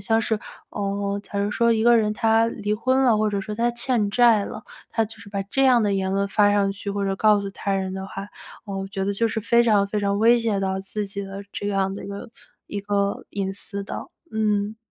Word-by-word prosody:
像 225 0 +3
是， 220 -1 0 0.3
呃， 200 0 -2
假 200 0 -5
如 200 +1 0
说 235 +2 +3
一 220 -1 +1
个 240 0 +6
人 210 -1 +2
他 225 +1 +3
离 210 -2 -3
婚 260 +4 +1
了， 235 -4 +5
或 215 - +2
者 200 - -1
说 210 +1 -5
他 235 +2 +1
欠 235 -3 0
债 230 -3 +5
了， 215 - -8 0.3
他 225 - +1
就 220 +1 -11
是 205 - -12
把 200 -1 -3
这 270 +8 0
样 250 -3 +5
的 205 - +1
言 190 -1 -1
论 200 0 +1
发 205 0 +4
上 200 -1 +2
去 200 +1 -5
或 200 0 -2
者 195 0 0
告 210 0 +4
诉 200 0 -5
他 200 0 -3
人 190 -1 -1
的 190 0 -5
话， 195 +1 -7 0.4
我 195 -2 -4
觉 195 -1 -3
得 200 - 0
就 230 +3 +1
是 220 - -2
非 235 +2 +4
常 210 -4 +3
非 210 +1 -2
常 200 0 0
威 235 +2 +6
胁 225 -4 0
到 190 0 -1
自 205 +1 -4
己 200 0 -5
的 195 0 -7
这 205 - -3
样 195 -1 0
的 - - -7
一 - - -7
个 200 +3 -7 0.4
一 205 - -4
个 200 0 -1
隐 195 -1 -2
私 200 0 -4
的， - - -6 0.2
嗯。 210 -1 0
205 Hz, 265 characters per minute, -23 LUFS, 200-220 Hz, 0.4 s, 个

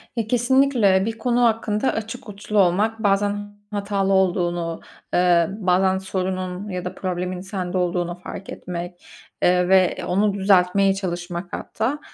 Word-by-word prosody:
Ya, 230 -3 -2
kesinlikle. 240 -5 +3
Bir 225 0 -3
konu 245 +1 +1
hakkında 220 0 +1
açık 225 +2 -6
uçlu 205 +1 -2
olmak, 210 +5 +2
bazen 205 +1 0 0.2
hatalı 200 -1 0
olduğunu, 175 -3 0 0.3
eee, 175 -2 +4
bazen 190 0 +2
sorunun 185 0 -3
ya 180 -2 -4
da 180 +1 -5
problemin 180 -1 -3
sende 185 -1 -4
olduğunu 175 -1 -1
fark 185 +2 -9
etmek, 175 0 -7 0.4
eee, 180 0 +3
ve 190 -1 +4
onu 200 +3 +2
düzeltmeye 195 0 +3
çalışmak 175 -2 -5
hatta. 250 +7 -2
190 Hz, 135 wpm, -22 LUFS, 180-210 Hz, 0.4 s, eee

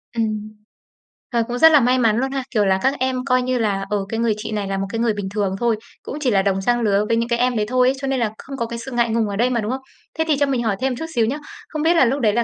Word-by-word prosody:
Ừm. 215 -2 -2 0.8
Ờ, 235 -1 +2
cũng 245 0 -3
rất 320 0 +8
là 300 - +7
may 250 +1 +3
mắn 225 -2 +3
luôn 265 +2 -1
ha. 270 -1 -2
Kiểu 210 -4 +2
là, 190 0 +2
các 270 - +2
em 260 0 -1
coi 255 -1 +2
như 255 0 0
là, 200 -4 0
ờ, 210 - +1
"cái 225 - -2
người 230 -2 +2
chị 220 +1 -6
này 205 -2 -2
là 195 0 -2
một 195 - -1
cái 225 - -3
người 230 -2 +2
bình 200 -2 -4
thường 200 -2 -1
thôi", 235 -2 +2 0.3
cũng 290 - -6
chỉ 255 -4 +1
là 195 -1 +3
đồng 195 -1 0
trang 240 +3 +1
lứa 205 -1 +2
với 230 - +1
những 235 +1 -1
cái 235 0 +1
em 250 -1 +2
đấy 210 - +1
thôi 255 0 +3
ấy, 265 - +3
cho 275 - -2
nên 265 -1 0
là 225 -2 +1
không 275 0 -8
có 235 - -1
cái 235 0 -6
sự 260 +3 -8
ngại 240 -1 +1
ngùng 225 -1 +1
ở 200 - -3
đây 240 +4 +2
mà, 235 -3 0
đúng 215 +3 -2
không? 265 0 -3 0.4
Thế - - +4
thì 300 -3 +2
cho 285 - +4
mình 260 -4 -1
hỏi 210 -3 0
thêm 260 -1 0
chút 320 - -5
xíu 230 -2 +3
nhá. 270 +6 -1 0.3
Không 305 -2 -4
biết 335 +2 +3
là 295 - +5
lúc 270 +4 0
đấy 210 -2 +3
là 235 +1 +2
235 Hz, 340 wpm, -21 LUFS, 215-255 Hz, 0.8 s, rất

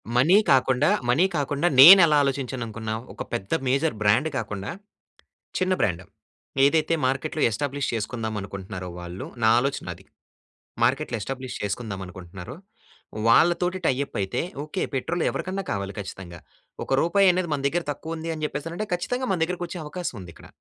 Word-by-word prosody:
Money 160 +11 +5
కాకుండా, 135 +4 +3 0.2
money 155 +10 +4
కాకుండా 145 +4 0
నేనెలా 165 0 +10
ఆలోచించాను 130 -2 -2
అనుకున్నా‌వు. 110 +1 -5
ఒక - - -6
పెద్ద 100 -4 -4 0.2
మేజర్ 135 0 +1
బ్రాండ్ 120 +10 +3
కాకుండా 105 -3 -4 0.9
చిన్న 185 0 +1
బ్రాండ్ 90 -2 0 0.6
ఏదైతే 160 +2 +3
మార్కెట్‌లో 140 +4 -2
ఎస్టాబ్లిష్ 140 +5 -2
చేసుకుందాం 110 0 -3
అనుకుంటున్నారో 95 -2 -7
వాళ్ళు 90 +1 -7 0.2
నా 110 - +5
ఆలోచన 135 +2 -2
అది. - - -18 0.8
మార్కెట్‌లో 130 0 0
ఎస్టాబ్లిష్ 130 0 -5
చేసుకుందాం 100 -1 -4
అనుకుంటున్నారో, 90 - -10 0.7
వాళ్ళతోటి 175 +7 +3
టై 130 - +3
అప్ - - -12
అయితే 95 0 -2 0.2
ఓకే 170 +5 -4
పెట్రోల్ 165 +6 -1
ఎవరికన్నా 190 +1 -4
కావాలి 100 0 -3
ఖచ్చితంగా. 95 -3 -8 0.5
ఒక - - -5
రూపాయి 195 +3 +4
అనేది 180 -2 -1
మన 140 - -2
దగ్గర 175 +3 -2
తక్కువ 160 +3 -7
ఉంది 165 +1 -5
అని 155 -1 -4
చెప్పేసి 150 +1 -6
అని 170 - -7
అంటే 215 - -3
ఖచ్చితంగా 250 +8 -2
మన 180 - 0
దగ్గరకి 175 +1 -4
వచ్చే 175 - -7
అవకాశం 160 -2 -5
ఉంది 85 -2 -10
ఇక్కడ. - - -15
135 Hz, 155 wpm, -25 LUFS, 110-165 Hz, 0.9 s, నేనెలా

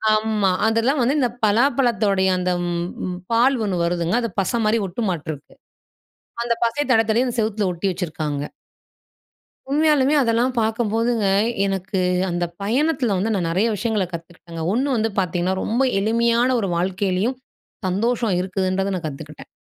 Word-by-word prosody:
ஆமா, 215 -2 +1 0.2
அதெல்லாம் 230 +6 +2
வந்து 255 +4 +2
இந்த 250 -3 +2 0.2
பலாப்பழத்தோடைய 215 -5 +2
அந்த 180 0 -1 0.2
ம் 175 +1 -3 0.2
பால் 255 +4 +4
ஒண்ணு 195 -4 -1
வருதுங்க, 170 0 -1
அது 230 - -2
பசை 215 +5 -1
மாரி 215 +2 +3
ஒட்டுமாட்டுருக்கு. 170 - -4 0.9
அந்த 235 0 +1
பசை 235 +6 0
தடவி 225 -3 +4
தடவி 235 +4 +3
அந்த 245 - -3
செவத்துல 215 -2 0
ஒட்டி 175 +3 -4
வச்சிருக்காங்க. 155 -5 -3 1.3
உண்மையாலுமே 295 -1 +3
அதெல்லாம் 235 +2 +1
பாக்கம்போதுங்க, 225 0 0 0.4
எனக்கு 195 0 -2 0.3
அந்த 175 0 -1 0.2
பயணத்தில 250 0 +1
வந்து, 220 +4 0
நான் 175 -3 -1
நெறைய 195 +7 +1
விஷயங்கள 215 -3 0
கத்துக்கிட்டங்க. 170 0 -8
ஒண்ணு 265 +5 +1
வந்து 225 0 +1
பாத்தீங்கன்னா, 180 0 0
ரொம்ப 235 +4 0 0.2
எளிமையான 235 +3 +2
ஒரு 195 - -1
வாழ்க்கையிலேயும், 190 +6 0 0.5
சந்தோஷம் 225 +2 0
இருக்குதுன்றத 190 +1 -1
நான் 170 -3 -5
கத்துக்கிட்டேன். 150 +1 -9
210 Hz, 135 wpm, -21 LUFS, 180-235 Hz, 1.3 s, பால்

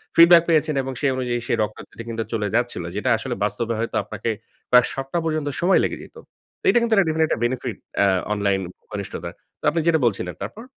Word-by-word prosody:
Feedback 170 0 +8
পেয়েছেন 155 -1 +2
এবং 135 0 -4
সেই 140 - +2
অনুযায়ী 120 -2 -1
সে - - 0
রক্ত 105 0 -2
দিতে 115 - -9
কিন্তু 115 0 -2
চলে 105 -2 0
যাচ্ছিল। 120 -7 0
যেটা 115 +5 -1
আসলে 120 +1 -4
বাস্তবে 115 +3 -1
হয়তো 115 - -3
আপনাকে - - -4 0.4
প্রায় 125 -1 +7
সপ্তাহ 135 +5 -3
পর্যন্ত 155 -2 -1
সময় 180 +3 +4
লেগে - - -1
যেত। - - -16 0.5
এটা - - +4
কিন্তু 230 -1 +1
একটা 195 -3 +4
definitely 160 0 +2
একটা 110 - -1
benefit 125 -3 -3 0.3
আ - - +5 0.3
অনলাইন 100 -2 +1 0.3
ঘনিষ্ঠতার। 100 -2 -5 0.3
তো - - -43
আপনি 165 +2 -1
যেটা 160 -2 +4
বলছিলেন 95 -5 -1
তারপর? 225 - -6
125 Hz, 200 wpm, -22 LUFS, 115-160 Hz, 0.5 s, Feedback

